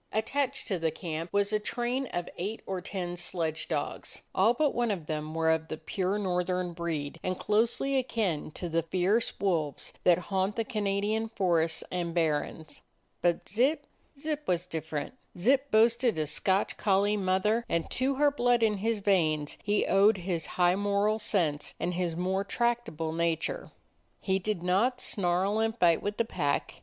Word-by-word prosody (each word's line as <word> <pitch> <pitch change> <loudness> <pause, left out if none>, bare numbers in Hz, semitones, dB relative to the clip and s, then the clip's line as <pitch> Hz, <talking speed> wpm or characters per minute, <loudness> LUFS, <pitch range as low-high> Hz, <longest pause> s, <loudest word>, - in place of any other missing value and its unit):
Attached 270 +5 -1
to 190 -4 -1
the 165 0 +1
camp 165 +1 -5
was 200 +1 +1
a 215 - +3
train 245 +5 -2
of 175 -5 -3
eight 205 +5 -4
or 190 -1 -3
ten 180 -2 -4
sledge 165 -3 -2
dogs; 150 -3 -4
all 220 +6 +4
but 295 +1 +2
one 240 -1 +1
of 185 -7 -2
them 155 0 -4
were 160 0 +3
of 160 0 0
the 155 - -5
pure 190 +4 -1
northern 180 -2 -1
breed 165 -3 -3
and 185 0 -2
closely 230 +6 +1
akin 220 - 0
to 180 - -5
the 165 0 +1
fierce 185 +7 0
wolves 165 -7 -1
that 175 -2 +6 0.2
haunt 190 +2 +1
the 230 - 0
Canadian 215 0 -1
forests 170 -7 +1
and 175 -2 -2
barrens. 155 -1 -1 0.4
But 175 -1 +1
Zip 255 - +1 0.2
— 280 - -28
Zip 305 0 -2
was 180 -1 +1
different. 160 -2 -4 0.2
Zip 265 +9 +3
boasted 230 -1 +4
a 155 - 0
Scotch 190 +6 0
collie 205 0 +2
mother, 200 +4 +1
and 170 -1 0
to 265 +2 +1
her 290 +1 +4
blood 245 -4 +2
in 210 -2 +3
his 220 +1 -1
veins 155 -7 +1
he 205 0 +1
owed 200 +2 +5
his 175 -3 -3
high 180 0 +4
moral 205 +2 +1
sense 170 -9 -1
and 180 - -1
his 175 -2 -1
more 190 +3 0
tractable 230 -8 -1
nature. 165 -1 -1 0.5
He 190 -1 0
did 190 -2 -2
not 215 +8 +2
snarl 195 0 0
and 225 +1 0
fight 170 -5 +4
with 205 +1 -3
the 230 - +2
pack. 145 -10 -1
190 Hz, 170 wpm, -29 LUFS, 170-220 Hz, 0.5 s, that